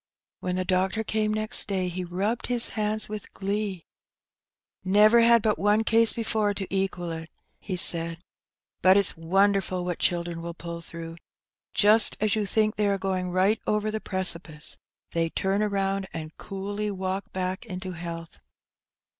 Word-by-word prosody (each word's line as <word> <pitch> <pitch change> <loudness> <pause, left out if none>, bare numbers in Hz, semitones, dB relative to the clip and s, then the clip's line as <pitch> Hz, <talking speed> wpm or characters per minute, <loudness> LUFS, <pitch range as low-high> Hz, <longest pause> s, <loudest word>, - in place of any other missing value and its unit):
When 180 0 -3
the 185 0 -2
doctor 190 +4 0
came 215 0 -1
next 215 0 0
day 190 -2 -1
he 180 +1 -4
rubbed 195 +7 -2
his 245 -1 +5
hands 215 0 0
with 210 -1 -7
glee. 200 -2 -3 1.0
Never 210 +5 +5
had 235 -1 +5
but 215 -2 +1
one 210 +2 +3
case 225 0 +4
before 215 -3 -1
to 195 - -3
equal 185 -3 -2
it!" 160 0 -7 0.3
he 190 - -5
said, 170 -2 +3 0.6
but 185 +1 +6
it's 200 - +2
wonderful 185 +1 +1
what 175 -2 -3
children 170 -1 -1
will 170 0 -6
pull 170 0 -7
through: 165 0 -9 0.6
just 215 +1 +7
as 215 -1 +1
you 210 -2 -1
think 215 +1 +1
they 210 -1 +1
are 200 -1 +1
going 185 -1 -2
right 190 +5 +1
over 210 0 0
the 220 0 -4
precipice, 170 -5 -2 0.4
they 165 -1 0
turn 195 +4 -1
round, 195 -2 -1
and 155 -1 -7
coolly 200 +2 -5
walk 190 +1 -4
back 185 +2 -3
into 185 -1 -6
health." 165 - -8
195 Hz, 160 wpm, -26 LUFS, 180-210 Hz, 1.0 s, just